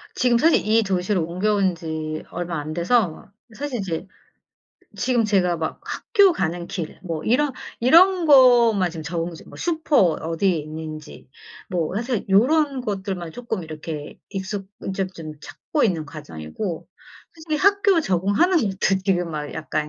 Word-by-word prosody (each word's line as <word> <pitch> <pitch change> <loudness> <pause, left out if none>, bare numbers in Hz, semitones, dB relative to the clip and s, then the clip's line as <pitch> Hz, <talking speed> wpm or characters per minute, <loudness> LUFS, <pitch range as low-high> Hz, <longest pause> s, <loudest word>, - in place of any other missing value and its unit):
지금 245 -2 +3
사실 320 0 +3
이 225 +1 +4
도시로 185 -2 0
옮겨온 190 +2 +1
지 160 -2 -5
얼마 170 -2 -3
안 155 +1 -6
돼서 180 0 0 0.3
사실 280 -4 -4
이제 180 -1 -4 0.9
지금 245 -3 +1
제가 185 -4 +2
막 160 -1 -4
학교 400 -4 +3
가는 170 - -2
길 170 -4 -6
뭐 165 -4 -4
이런 275 +5 +2 0.3
이런 345 +7 +5
거만 240 - +6
지금 165 -2 -7
적응 170 +2 -3
중 - - -13
뭐 - - -12
슈퍼 320 -3 0
어디에 165 +1 +2
있는지. 155 -1 -8 0.4
뭐 175 -2 -1
사실 235 0 -2
요런 270 +7 +3
것들만 190 -6 -4
쪼끔 225 -4 -4
이렇게 155 -1 -7
익숙 195 0 -5 0.3
좀 190 -1 -1
좀 160 -2 -7
찾고 295 - -2
있는 170 -7 0
과정이고 150 - -6 0.5
솔직히 315 -2 -3
학교 400 +1 +4
적응하는 205 - +2
것도 195 -4 0
지금 180 -3 +1
막 150 -1 -5
약간 155 -1 -3
190 Hz, 280 characters per minute, -22 LUFS, 165-245 Hz, 0.9 s, 거만